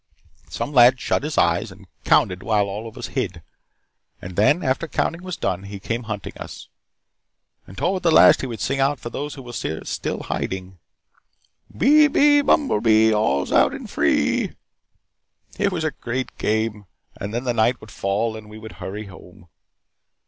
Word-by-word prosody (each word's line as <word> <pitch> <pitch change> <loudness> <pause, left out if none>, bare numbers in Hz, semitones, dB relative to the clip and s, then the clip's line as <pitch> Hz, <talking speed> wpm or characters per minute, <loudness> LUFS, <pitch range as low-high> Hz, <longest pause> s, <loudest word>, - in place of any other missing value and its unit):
Some 145 - -4
lad 125 0 +6
shut - - 0
his 150 +2 -4
eyes 85 +5 +2
and 95 +2 -15 0.2
counted 90 0 +3
while 105 -2 +1
all 105 +3 -6
of 115 +2 -12
us - - -6
hid. 95 -11 -3 0.8
And 90 0 -9
then, 145 - +3
after 135 +4 0
the - - -29
counting 165 +1 -1
was 185 -2 -6
done, 95 -2 -2
he 100 0 -8
came 115 +4 -4
hunting 105 -2 -5
us. - - -9 1.0
And 95 - -13
toward 185 - 0
the 170 - +2
last 160 - +7
he 135 - -3
would 115 -5 -7
sing 135 - -1
out 140 +1 +1
for 120 - -7
those 145 +3 -5
who 135 - -10
were 120 -1 -10
still 80 -8 -4
hiding: 95 -1 -4 1.0
'Bee, 300 +3 +6
bee, 290 0 +4
bumblebee, 110 - +3
all's 70 -10 0
out's - - +4
in - - -8
free.' - - 0 1.0
It 200 -1 +2
was 170 -3 -2
a 155 - 0
great 125 0 -5
game, 110 -1 -1 0.3
and 100 - -5
then 120 +3 -3
the 125 -2 0
night 115 +2 +2
would 110 - -13
fall 105 +4 -1
and 110 -1 -10
we 105 - -11
would 110 0 -10
hurry 105 +3 -5
home. 90 -2 -15
115 Hz, 180 wpm, -22 LUFS, 100-135 Hz, 1.0 s, last